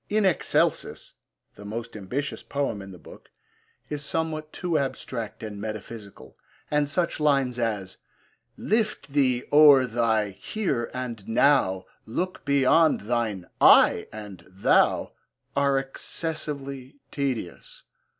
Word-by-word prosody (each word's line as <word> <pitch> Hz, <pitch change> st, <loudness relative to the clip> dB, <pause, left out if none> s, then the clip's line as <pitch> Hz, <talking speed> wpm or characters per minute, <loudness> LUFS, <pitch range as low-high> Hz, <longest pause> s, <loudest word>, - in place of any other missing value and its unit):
In 215 Hz, 0 st, +2 dB
Excelsis, 185 Hz, -6 st, 0 dB, 0.4 s
the 105 Hz, -, -13 dB
most 115 Hz, +3 st, -6 dB
ambitious 125 Hz, +8 st, -4 dB
poem 140 Hz, -8 st, -3 dB
in 95 Hz, -, -10 dB
the 90 Hz, -, -11 dB
book, -, -, -15 dB, 0.6 s
is 150 Hz, -1 st, -4 dB
somewhat 155 Hz, 0 st, -3 dB
too 170 Hz, -4 st, -1 dB
abstract 125 Hz, -5 st, -4 dB
and 105 Hz, -2 st, -6 dB
metaphysical, 110 Hz, -1 st, -8 dB, 0.4 s
and 150 Hz, -1 st, +1 dB
such 170 Hz, +2 st, -1 dB
lines 135 Hz, -5 st, +2 dB
as 105 Hz, -5 st, -2 dB, 0.6 s
Lift 215 Hz, -6 st, -1 dB
thee 130 Hz, -4 st, +2 dB
o'er 145 Hz, -3 st, +8 dB
thy 110 Hz, -3 st, +1 dB
'here' 120 Hz, -, -3 dB
and 120 Hz, -5 st, -6 dB
'now,' 115 Hz, -6 st, +3 dB, 0.2 s
Look 180 Hz, +11 st, -3 dB
beyond 140 Hz, +3 st, +4 dB
thine 110 Hz, -4 st, -2 dB, 0.2 s
'I' -, -, +6 dB
and 105 Hz, -3 st, -9 dB
'thou,' 95 Hz, +2 st, +2 dB, 0.4 s
are 140 Hz, -1 st, +2 dB
excessively 140 Hz, -1 st, -5 dB
tedious. 130 Hz, -, -4 dB
130 Hz, 115 wpm, -26 LUFS, 110-150 Hz, 0.6 s, o'er